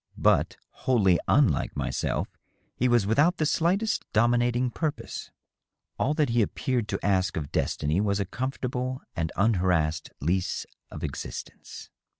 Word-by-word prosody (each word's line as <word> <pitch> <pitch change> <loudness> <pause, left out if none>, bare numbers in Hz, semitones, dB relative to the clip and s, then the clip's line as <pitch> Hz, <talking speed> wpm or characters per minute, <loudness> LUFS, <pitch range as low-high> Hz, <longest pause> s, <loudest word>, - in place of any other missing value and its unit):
But, - - +2
wholly 100 -9 +2
unlike - - +2
myself, - - -1 0.5
he 125 - +1
was 120 -4 +3
without 145 - +3
the 155 - +1
slightest 185 +8 +1
dominating 120 +2 +2
purpose. 155 +1 -4 0.7
AH 150 - +2
that 150 -3 +1
he 120 0 +3
appeared 120 +1 -1
to - - -3
ask 95 0 +1
of 75 -3 -4
destiny 75 +6 0
was 100 -1 +1
a 100 - 0
comfortable 130 +3 -3
and 80 -1 -1
unharassed 90 -6 +1
lease 90 +5 -1 0.2
of - - -8
existence. - - -7
115 Hz, 135 wpm, -27 LUFS, 95-130 Hz, 0.7 s, was